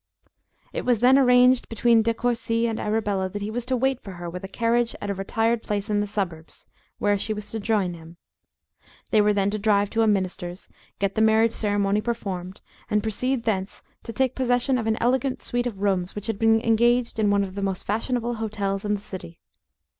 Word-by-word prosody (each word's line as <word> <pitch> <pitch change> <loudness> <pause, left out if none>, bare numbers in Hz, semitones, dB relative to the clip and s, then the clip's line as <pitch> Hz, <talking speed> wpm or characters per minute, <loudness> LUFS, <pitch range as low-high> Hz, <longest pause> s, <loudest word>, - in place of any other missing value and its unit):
It - - -3
was 245 -2 +1
arranged 250 -1 +5
between 230 0 +3
De 230 +1 +1
Courci 230 -1 0
and 225 -1 -3
Arabella 210 -3 -1
that 205 +2 -5
he 210 - -3
was 240 +1 -3
to 260 0 +1
wait 265 +1 0
for 195 - -9
her 175 -1 -7
with 180 +2 -7
a - - -4
carriage 235 +3 0
at 205 - -3
a - - 0
retired 225 +4 0
place 205 0 -3
in 205 - +2
the 205 - -1
suburbs, 175 -6 -5 0.3
where 205 -1 +1
she 215 +2 -1
was 210 0 -6
to 225 - -3
join 200 -4 0
him. 165 0 -13 0.9
They 215 - +5
were 210 0 +3
then 200 -1 +1
to 215 - -2
drive 205 -1 +2
to 225 - +1
a 225 - +3
minister's, 185 -3 -2 0.3
get 195 0 -1
the 220 - 0
marriage 220 +1 +4
ceremony 205 -1 0
performed, 195 -6 -4 0.3
and 210 -1 +1
proceed 240 +3 -1
thence 195 -4 -2 0.2
to 230 - -7
take 260 +2 0
possession 250 0 +1
of 225 - -3
an 220 0 +1
elegant 255 +2 0
suite 245 0 -1
of 200 -4 -6
rooms 185 -3 0
which 205 -1 -5
had 225 -3 -3
been 225 0 +4
engaged 235 +1 +2
in 210 -2 +3
one 200 0 +3
of 190 -1 -6
the 200 - -5
most 195 -2 -2
fashionable 240 +3 -1
hotels 205 -3 -3
in 210 0 0
the 200 - -7
city. 185 -4 -9
215 Hz, 210 wpm, -24 LUFS, 200-235 Hz, 0.9 s, arranged